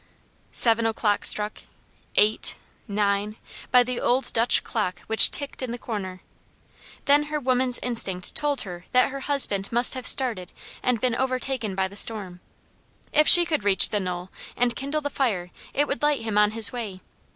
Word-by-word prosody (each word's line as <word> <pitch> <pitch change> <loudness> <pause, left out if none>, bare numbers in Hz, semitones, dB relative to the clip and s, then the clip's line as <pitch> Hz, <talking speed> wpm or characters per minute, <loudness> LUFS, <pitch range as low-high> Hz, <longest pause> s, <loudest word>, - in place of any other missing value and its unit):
Seven 230 -1 +3
o'clock 215 -2 -1
struck 210 0 +2 0.5
eight 210 +1 +1 0.3
nine 205 0 -2 0.3
by 250 -1 +4
the 250 0 -4
old 255 +2 0
Dutch 230 +1 +2
clock 210 -5 -4
which 220 -1 +6
ticked 285 -2 -2
in 255 -2 -5
the 240 - -5
corner. 195 -6 -7 0.8
Then 290 +1 +3
her 300 0 -4
woman's 255 -2 0
instinct 195 -7 +1
told 290 -3 0
her 180 -2 -9
that 255 +2 +2
her 275 - -7
husband 260 -9 -1
must 240 +1 +4
have 255 -1 -3
started 225 -9 0 0.3
and 250 -2 -1
been 250 0 -1
overtaken 255 -4 -3
by 190 0 -1
the 195 - -14
storm. 200 -4 0 0.7
If 305 +1 +3
she 350 -1 +9
could 310 -10 -3
reach 200 -2 +5
the 210 - -2
knoll 180 -1 -6 0.3
and 240 -1 0
kindle 280 +4 -4
the 290 -1 -5
fire 195 -11 -2 0.2
it 290 +1 -1
would 275 - -4
light 295 -1 0
him 220 -2 -4
on 210 0 +3
his 220 -1 +1
way. 210 -6 -7
230 Hz, 175 wpm, -23 LUFS, 200-260 Hz, 0.8 s, she